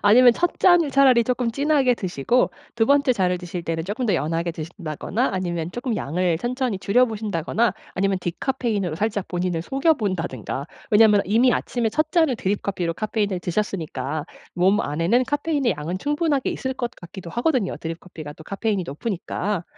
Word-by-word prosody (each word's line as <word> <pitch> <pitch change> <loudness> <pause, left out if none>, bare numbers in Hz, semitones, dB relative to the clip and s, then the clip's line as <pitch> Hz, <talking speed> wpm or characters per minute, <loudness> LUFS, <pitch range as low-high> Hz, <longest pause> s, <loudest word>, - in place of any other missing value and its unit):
아니면 245 +3 +7
첫 350 +7 -1
잔을 350 -5 +5
차라리 260 -4 +5
쪼끔 250 -1 0
진하게 275 -1 +2
드시고 185 - 0 0.3
2 225 -1 +3
번째 280 -2 +4
잔을 180 -4 +1
드실 175 -1 -6
때는 165 -1 -2
쪼끔 215 +6 -2
더 200 - +2
연하게 165 +2 -1
드신다거나 165 - -3
아니면 175 -3 -2
쪼끔 240 -2 -2
양을 170 +2 0
천천히 245 -2 -2
줄여 245 +6 +3
보신다거나 215 0 -1 0.2
아니면 195 0 +1
디카페인으로 205 - -2
살짝 205 +1 -1
본인을 175 -2 -1
속여 275 - +2
본다든가. 165 - -3 0.3
왜냐하면 210 -1 +6
이미 230 +5 +4
아침에 235 -2 -1
첫 310 +6 -1
잔을 320 -8 +3
드립 200 0 -1
커피로 175 -4 -2
카페인을 210 -3 -1
드셨으니까 160 -7 -2 0.3
몸 190 +5 +3
안에는 170 - +1
카페인의 290 - 0
양은 165 +5 -4
충분하게 295 - 0
있을 260 - -3
것 240 -2 -3
같기도 175 0 -10
하거든요 245 - 0
드립 165 +1 -5
커피가 155 -5 -9
또 160 - -14
카페인이 200 -1 -1
높으니까. 185 +3 -3
205 Hz, 415 characters per minute, -23 LUFS, 175-250 Hz, 0.3 s, 아니면